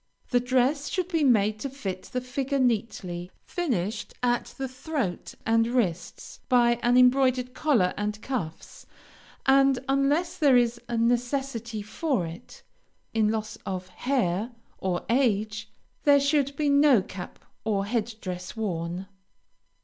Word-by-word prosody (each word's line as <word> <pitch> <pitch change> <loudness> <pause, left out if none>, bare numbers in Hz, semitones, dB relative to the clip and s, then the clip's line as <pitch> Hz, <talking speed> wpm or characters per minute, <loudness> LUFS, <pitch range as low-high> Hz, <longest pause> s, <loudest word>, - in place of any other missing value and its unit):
The 245 - +4
dress 260 +3 +1
should 365 -1 -2
be 325 -4 +1
made 215 -5 +3
to 275 - -4
fit 195 -9 -5
the 250 - -1
figure 265 +2 -2
neatly, 200 -8 -1 0.2
finished 230 - -2
at 240 -1 +2
the 270 - -2
throat 255 - -4
and 225 0 +3
wrists 190 -9 -2
by 240 -2 +4
an 245 +1 +3
embroidered 255 0 +4
collar 250 -11 +2
and 210 0 -3
cuffs, 215 -11 -5 0.6
and, 270 0 +5
unless 280 +6 +1
there 275 -5 +6
is 235 -1 +1
a 235 - -1
necessity 235 -1 -1
for 220 - -1
it, 165 +1 -10 0.5
in 220 -2 +3
loss 215 0 -3
of 185 -1 -4
the 185 - -21
hair 235 -3 -1 0.3
or 180 -2 -2
age, 215 -4 +1 0.3
there 285 -1 +6
should 280 0 +1
be 295 +1 0
no 280 -6 +5
cap 185 -1 -8 0.3
or 200 -3 0
head 225 +1 -2
dress 180 +3 -6
worn. 175 -3 -3
240 Hz, 140 wpm, -27 LUFS, 210-270 Hz, 0.6 s, there